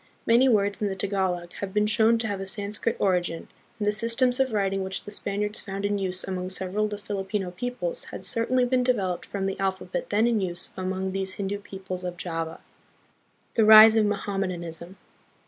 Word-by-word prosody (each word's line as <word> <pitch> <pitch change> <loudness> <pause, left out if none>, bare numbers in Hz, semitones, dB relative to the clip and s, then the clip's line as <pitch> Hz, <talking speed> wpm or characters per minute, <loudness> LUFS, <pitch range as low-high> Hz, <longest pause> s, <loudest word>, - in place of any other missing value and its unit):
Many 240 +3 +5
words 205 -3 +2
in 210 - +1
the 195 - -3
Tagalog 185 -3 -2
have 200 0 -5
been 210 0 +3
shown 220 +2 +3
to 225 -1 -1
have 200 -2 -3
a - - -4
Sanskrit 205 +3 -2
origin, 180 -4 0 0.3
and 210 - -2
the 210 - +3
systems 235 +4 +2
of 265 -2 +2
writing 195 -2 0
which 190 0 -3
the 205 - -8
Spaniards 205 +1 -2
found 200 0 -5
in 205 0 0
use 185 -1 -3
among 185 -1 -4
several 190 +3 -1
of - - -2
the 205 - -5
Filipino 195 -2 -3
peoples 250 - -4
had - - -7
certainly 245 +2 +2
been 250 +1 +2
developed 200 -8 0
from 195 -1 -3
the 195 0 -3
alphabet 190 -1 -2
then 210 +2 +2
in 230 -3 +2
use 175 -2 -3
among 190 0 -3
these 190 0 -3
Hindu 200 0 -3
peoples 190 -2 -7
of 180 -1 -5
Java. 165 -2 -4 0.9
The 225 - +3
Rise 220 +1 +10
of 215 -2 +3
Mohammedanism. 185 -4 -4
200 Hz, 195 wpm, -26 LUFS, 190-215 Hz, 0.9 s, Rise